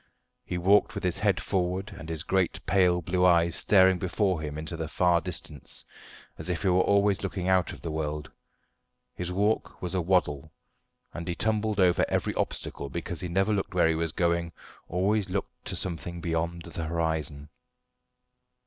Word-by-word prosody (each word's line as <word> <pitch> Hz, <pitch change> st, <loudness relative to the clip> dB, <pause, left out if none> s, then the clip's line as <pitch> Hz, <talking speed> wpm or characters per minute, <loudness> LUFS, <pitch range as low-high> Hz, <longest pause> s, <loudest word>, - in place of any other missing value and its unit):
He 90 Hz, -, -4 dB
walked 95 Hz, +4 st, +4 dB
with -, -, -4 dB
his -, -, 0 dB
head -, -, +2 dB
forward 95 Hz, +1 st, -2 dB
and 80 Hz, -3 st, -9 dB
his 80 Hz, -2 st, -3 dB
great 95 Hz, -2 st, +1 dB
pale 90 Hz, -3 st, +3 dB
blue 90 Hz, +2 st, 0 dB
eyes 85 Hz, -2 st, +4 dB
staring 95 Hz, -2 st, +5 dB
before 95 Hz, -2 st, 0 dB
him 75 Hz, -1 st, -5 dB
into 80 Hz, +2 st, -4 dB
the 80 Hz, -1 st, -4 dB
far 85 Hz, +1 st, +2 dB
distance, 90 Hz, -3 st, -7 dB, 0.5 s
as -, -, -4 dB
if 90 Hz, +1 st, -2 dB
he 95 Hz, -, +3 dB
were 90 Hz, 0 st, +4 dB
always 100 Hz, 0 st, +3 dB
looking 95 Hz, -2 st, -3 dB
out 95 Hz, -1 st, +3 dB
of -, -, -11 dB
the 80 Hz, -, -3 dB
world. 75 Hz, -1 st, -3 dB, 0.8 s
His 90 Hz, 0 st, -4 dB
walk 105 Hz, +4 st, 0 dB
was 90 Hz, 0 st, -4 dB
a 95 Hz, -, +1 dB
waddle, 80 Hz, -4 st, +1 dB, 0.6 s
and 85 Hz, 0 st, -6 dB
he 85 Hz, -, -1 dB
tumbled 110 Hz, +1 st, 0 dB
over 90 Hz, -2 st, +4 dB
every -, -, 0 dB
obstacle, 70 Hz, -, -2 dB
because 85 Hz, +2 st, -3 dB
he 90 Hz, -, -3 dB
never 95 Hz, +5 st, +1 dB
looked 95 Hz, -2 st, -2 dB
where 85 Hz, -, +4 dB
he 80 Hz, -, +3 dB
was 80 Hz, 0 st, -1 dB
going, 85 Hz, 0 st, 0 dB, 0.4 s
always 95 Hz, +3 st, +1 dB
looked 95 Hz, +1 st, -4 dB
to -, -, -3 dB
something 85 Hz, -1 st, -3 dB
beyond 85 Hz, 0 st, -2 dB
the 85 Hz, -1 st, -5 dB
horizon. 80 Hz, -3 st, -2 dB
90 Hz, 175 wpm, -28 LUFS, 80-95 Hz, 0.8 s, staring